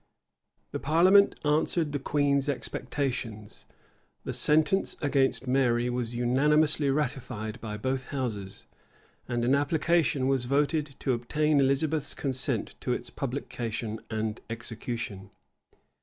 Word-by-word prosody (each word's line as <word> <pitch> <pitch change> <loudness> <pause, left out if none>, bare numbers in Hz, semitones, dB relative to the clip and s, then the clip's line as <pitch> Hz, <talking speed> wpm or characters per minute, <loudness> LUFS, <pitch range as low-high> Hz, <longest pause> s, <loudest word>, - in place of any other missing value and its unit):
[*] - - -48
The - - -3
parliament 185 +7 +5
answered 155 +1 +1
the 145 - -2
queen's 140 0 +1
expectations: 125 -6 -4 0.6
the - - -4
sentence 155 +6 +3
against 135 -2 +1
Mary 125 -2 +2
was 120 -1 -2
unanimously 145 +4 +2
ratified 125 -6 -2
by 105 -2 -5
both 130 +4 -2
houses, 110 -8 -4 0.6
and 120 -1 -1
an 130 - +3
application 145 0 +2
was 135 -2 +1
voted 145 +2 0
to 130 - +1
obtain 150 +5 +1
Elizabeth's 140 +2 +1
consent 130 -2 -1
to - - -1
its - - -5
publication 110 -2 -4
and 110 -1 -3
execution. 115 -3 -5
135 Hz, 115 wpm, -28 LUFS, 120-150 Hz, 0.6 s, parliament